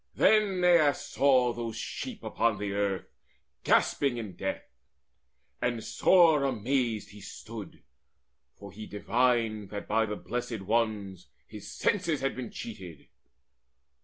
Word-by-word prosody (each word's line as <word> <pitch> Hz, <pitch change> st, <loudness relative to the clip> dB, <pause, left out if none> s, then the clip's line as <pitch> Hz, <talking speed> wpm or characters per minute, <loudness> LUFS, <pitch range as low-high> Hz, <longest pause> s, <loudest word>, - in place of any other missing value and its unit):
Then 205 Hz, -4 st, +3 dB
Aias 170 Hz, -5 st, +5 dB
saw 130 Hz, -3 st, +2 dB
those 115 Hz, -2 st, -5 dB
sheep -, -, -6 dB
upon 115 Hz, -2 st, 0 dB
the 100 Hz, 0 st, -3 dB
earth 100 Hz, -1 st, -1 dB, 0.6 s
Gasping 135 Hz, -4 st, +2 dB
in 110 Hz, -5 st, -6 dB
death; 95 Hz, 0 st, -3 dB, 1.0 s
and 120 Hz, -2 st, -1 dB
sore 165 Hz, -6 st, +4 dB
amazed 120 Hz, -3 st, -1 dB
he 105 Hz, 0 st, -13 dB
stood, 110 Hz, +1 st, -9 dB, 0.7 s
For 100 Hz, 0 st, -11 dB
he 110 Hz, +1 st, -9 dB
divined 115 Hz, -1 st, 0 dB
that 105 Hz, 0 st, -6 dB
by 110 Hz, +1 st, +2 dB
the 105 Hz, -, -3 dB
Blessed 120 Hz, -1 st, -4 dB
Ones 100 Hz, -4 st, -1 dB, 0.2 s
His -, -, -10 dB
senses 170 Hz, -8 st, 0 dB
had 135 Hz, 0 st, -1 dB
been 125 Hz, -3 st, -5 dB
cheated. 95 Hz, -8 st, -9 dB
115 Hz, 125 wpm, -29 LUFS, 105-135 Hz, 1.0 s, Aias